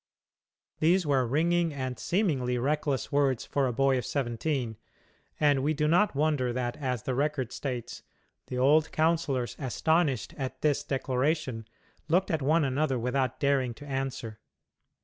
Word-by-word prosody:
These 175 +3 +3
were 135 -4 +2
ringing 170 +5 +2
and, 130 -3 -4
seemingly, 145 - 0
reckless 140 +1 -1
words 140 -4 +1
for 140 -2 0
a - - 0
boy 135 +2 +2
of - - -5
seventeen, 120 -2 -2 0.6
and 145 -3 +3
we 155 +3 +1
do 150 +1 +1
not 175 +2 +3
wonder 145 -4 +1
that, 120 0 -2
as 130 -5 -2
the 130 - -2
record 135 -2 -1
states, 125 -4 -5 0.5
"the 125 - -4
old 150 +5 +4
councillors, 155 -6 0
astonished 145 0 0
at 130 -1 -4
this 150 -2 +2
declaration, 130 -3 -1 0.4
looked 180 +5 +2
at 160 -2 0
one 155 +4 +3
another 135 0 0
without 125 +2 -1
daring 135 -4 +1
to 145 - -11
answer." 135 -5 -4
135 Hz, 150 wpm, -28 LUFS, 125-155 Hz, 0.6 s, old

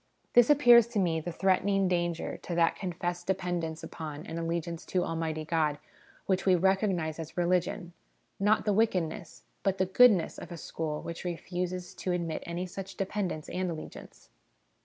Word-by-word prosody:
This 245 +1 +6
appears 245 -6 +7
to 235 -3 -1
me 170 -4 +1
the 175 +3 -5
threaten 190 +2 +2
ing 195 -1 +2
danger 175 -2 -1
to 175 - -5
that 170 -1 +3
confessed 175 -1 -4
dependence 175 -4 -2
upon 155 -1 -7
and 165 - -5
allegiance 170 0 -3
to 180 -1 +1
Almighty 160 -1 -3
God 155 -2 +1 0.5
which 190 -1 +1
we 185 -2 +5
recognise 185 -3 +1
as 160 +1 -7
religion 175 +1 0 0.5
not 210 +2 +3
the 210 - +2
wickedness, 185 -7 -1 0.2
but 195 -1 0
the 190 - +2
goodness 190 -2 +4
of 175 - -9
a 170 - -6
school 155 -1 -4
which 170 0 -6
refuses 180 +1 -4
to 185 -1 -2
admit 170 -3 -2
any 170 +2 -3
such 190 +1 -8
dependence 190 -5 -2
and 185 0 -2
allegiance. 160 -2 -9
175 Hz, 165 wpm, -29 LUFS, 165-190 Hz, 0.5 s, appears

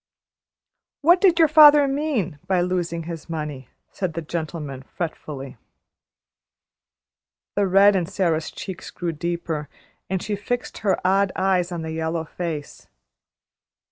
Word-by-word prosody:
"What 345 +4 +5
did 360 -4 +5
your 325 -2 +6
father 295 -2 +8
mean 270 - -1
by 185 -2 +2
losing 175 -2 -1
his 165 0 -8
money?" 150 -5 -5 0.2
said 185 -5 -3
the 165 - -3
gentleman, 155 -4 -5
fretfully. 140 -4 -6 2.0
The 200 -1 +2
red 195 +2 +6
in 175 -3 0
Sara's 165 -5 0
cheeks 190 -2 -8
grew 175 -1 -3
deeper, 165 -2 -3 0.4
and 190 0 0
she 210 -1 -2
fixed 245 +5 -4
her 200 -4 +1
odd 195 +1 +3
eyes 185 -2 +1
on 170 -2 -4
the 160 - -4
yellow 160 0 -2
face. 160 -3 -6
175 Hz, 130 wpm, -23 LUFS, 160-200 Hz, 2.0 s, father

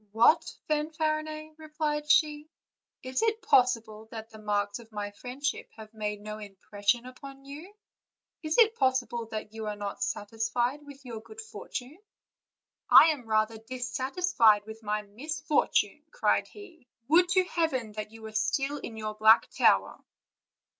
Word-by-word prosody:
"What, 235 +9 +4 0.2
Fanfarinet!" 310 0 -2
replied 300 -1 -3
she, 300 -1 +3 0.5
"is 255 0 -2
it 450 0 0
possible 230 -4 +2
that 225 0 -8
the 220 - -12
marks 205 -1 -1
of 230 -1 -15
my 205 -1 -4
friendship 260 +6 -4
have 220 0 -11
made 210 -1 -4
no 215 0 -7
impression 205 +3 -2
upon 270 +2 -11
you? 300 +7 -9 0.7
Is 310 -1 -1
it 450 -2 +6
possible 255 - 0
that 215 -1 -6
you 220 -1 -5
are 210 - -3
not 205 -1 -6
satisfied 225 +6 -1
with 280 -2 -13
your 230 -3 -7
good 220 -1 -13
fortune?" 245 - -7 0.9
"I 325 - +9
am 260 -7 -6
rather 220 0 +1
dissatisfied 245 - +1
with 220 +1 -10
my 210 0 -2
misfortune," 295 +8 0
cried - - +1
he; 350 -10 -14 0.2
"would 350 +4 +5
to 370 +1 +4
heaven 320 -11 -1
that 210 0 -6
you 225 0 -13
were 220 - -7
still 270 +6 0
in 225 -4 -8
your 215 -1 -4
black 220 +2 +5
tower!" - - +3
245 Hz, 145 wpm, -29 LUFS, 215-300 Hz, 0.9 s, I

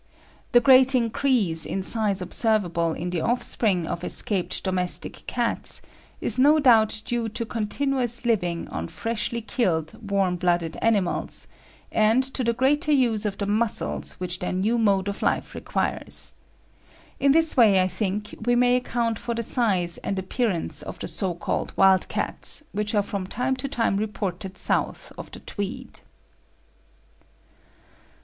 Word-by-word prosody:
The 240 - +7
great 260 +1 +6
increase 230 - +1
in 190 - 0
size 205 -2 +2
observable 175 -6 0
in 175 +2 -5
the 175 -2 -2
offspring 215 -6 0
of 170 +2 -5
escaped 190 0 -1
domestic 185 -2 -2
cats - - +3 0.4
is 235 - 0
no 295 +4 +5
doubt 220 -6 +3
due 235 -2 -2
to 230 +2 -4
continuous 240 +2 -1
living 180 -8 -1
on 80 +1 -5
freshly 230 - -3
killed, 180 - -1 0.2
warm 195 -3 0
blooded 175 -2 0
animals, 205 -5 0 0.5
and 220 +4 +3
to 265 0 -1
the 235 - +1
greater 290 +6 +1
use 235 -7 +2
of 200 - -5
the 200 - -3
muscles 215 +2 0
which 180 -1 -4
their 180 - -3
new 210 +6 0
mode 200 -3 +1
of 200 - -4
life - - -1
requires. - - -3 0.9
In 275 0 +3
this 320 +2 +4
way 215 -7 +5
I 185 - +2
think 210 +2 -4
we 245 +1 +2
may 245 0 +3
account 235 -3 -2
for 235 -1 -4
the 230 - -2
size 190 -8 0
and 195 - -4
appearance 190 -1 -2
of - - -8
the - - -6
so 175 +1 -2
called 170 - -3
'wild 190 -1 +4
cats' - - +4
which 210 +1 -2
are 205 - +2
from 195 -2 -5
time 250 +6 -1
to 275 - -4
time 230 -7 0
reported 195 -2 -4
south - - -2
of - - -9
the - - -11
Tweed. 205 +2 -6
215 Hz, 150 wpm, -24 LUFS, 185-240 Hz, 0.9 s, The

